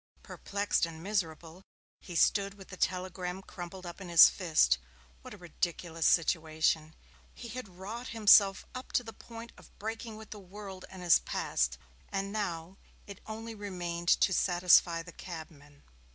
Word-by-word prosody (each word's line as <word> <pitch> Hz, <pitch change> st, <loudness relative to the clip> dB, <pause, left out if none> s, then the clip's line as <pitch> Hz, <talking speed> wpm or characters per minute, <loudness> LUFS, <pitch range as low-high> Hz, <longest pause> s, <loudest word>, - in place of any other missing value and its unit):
Perplexed 200 Hz, -3 st, -1 dB
and 165 Hz, 0 st, -10 dB
miserable, 170 Hz, -3 st, -3 dB, 0.4 s
he 175 Hz, -, -9 dB
stood 200 Hz, +3 st, +3 dB
with 195 Hz, -2 st, -14 dB
the 185 Hz, -, -8 dB
telegram 185 Hz, 0 st, -2 dB
crumpled 185 Hz, -1 st, -9 dB
up 175 Hz, +3 st, -8 dB
in 185 Hz, -, -7 dB
his 170 Hz, -2 st, +10 dB
fist. 155 Hz, -, +3 dB, 0.4 s
What -, -, -10 dB
a -, -, -14 dB
ridiculous 170 Hz, -1 st, -2 dB
situation! 160 Hz, -1 st, +1 dB, 0.4 s
He 235 Hz, -, -9 dB
had 250 Hz, -2 st, -6 dB
wrought 205 Hz, +7 st, -7 dB
himself 205 Hz, -3 st, +5 dB
up 255 Hz, 0 st, -8 dB
to 245 Hz, -, +2 dB
the 225 Hz, -1 st, -9 dB
point 230 Hz, 0 st, -10 dB
of -, -, -19 dB
breaking 225 Hz, +1 st, -5 dB
with 220 Hz, 0 st, -12 dB
the 210 Hz, -, -7 dB
world 195 Hz, 0 st, -9 dB
and 185 Hz, -1 st, -10 dB
his 175 Hz, -, +6 dB
past, 60 Hz, 0 st, -1 dB, 0.3 s
and 195 Hz, 0 st, -2 dB
now 180 Hz, -3 st, -3 dB, 0.3 s
it 200 Hz, -1 st, -10 dB
only 225 Hz, +1 st, -6 dB
remained 175 Hz, -5 st, -5 dB
to 190 Hz, -, +4 dB
satisfy 175 Hz, -2 st, +4 dB
the 170 Hz, -, -11 dB
cabman! 155 Hz, -4 st, -10 dB
185 Hz, 155 wpm, -31 LUFS, 170-205 Hz, 0.4 s, his